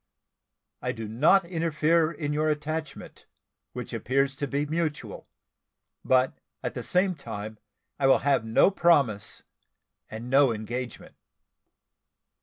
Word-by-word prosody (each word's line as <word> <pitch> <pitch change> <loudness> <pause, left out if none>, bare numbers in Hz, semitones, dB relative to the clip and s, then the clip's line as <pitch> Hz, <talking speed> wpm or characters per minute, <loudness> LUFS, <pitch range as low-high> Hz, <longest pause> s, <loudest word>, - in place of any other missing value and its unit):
I - - -2
do 110 -1 -6
not 155 - +4
interfere 165 -1 +1
in 150 -2 -3
your 155 +1 +1
attachment, 155 0 -5 0.5
which - - -7
appears 135 +2 0
to 145 - -2
be 140 +2 -1
mutual; 155 0 -3 0.8
but 130 0 +2 0.2
at - - -3
the - - -5
same 185 +1 +1
time, 110 -7 -7 0.4
I 135 - +3
will 135 - +6
have 140 -5 +3
no 115 - +4
promise, 140 - +1 0.7
and 110 +3 -7
no 135 0 +4
engagement. 120 +3 -6
145 Hz, 120 wpm, -27 LUFS, 120-160 Hz, 0.8 s, will